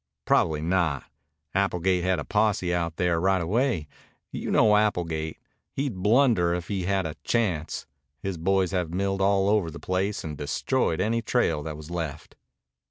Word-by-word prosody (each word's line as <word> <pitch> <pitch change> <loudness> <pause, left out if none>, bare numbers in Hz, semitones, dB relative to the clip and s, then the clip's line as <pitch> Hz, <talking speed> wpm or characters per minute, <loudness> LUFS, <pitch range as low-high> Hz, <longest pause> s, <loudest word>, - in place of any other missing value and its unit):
"Probably 75 -1 +2
not. 85 -5 +1 0.5
Applegate 95 -2 +1
had 95 0 +2
a 70 - -4
posse 105 -4 +1
out 85 -2 -1
there 85 -1 +1
right 95 +1 +3
away. 100 - 0 0.4
You - - -4
know 105 -1 +5
Applegate. 85 -7 0 0.4
He'd 135 -3 -1
blunder 105 -6 +4
if 85 -1 -5
he 95 -3 -2
had 95 -1 +1
a 80 - -5
chance. 90 -10 -1 0.3
His 95 -4 -4
boys 95 +2 +1
have 90 -4 -1
milled 95 +2 -1
all 100 0 +3
over 105 -5 +2
the 80 - -9
place 95 +3 -1
and 75 -2 -5
destroyed 75 +3 -1
any 115 +4 +1
trail 110 -10 +1
that 75 0 -6
was 75 +2 -10
left." 80 -4 -5
90 Hz, 165 wpm, -26 LUFS, 80-100 Hz, 0.5 s, know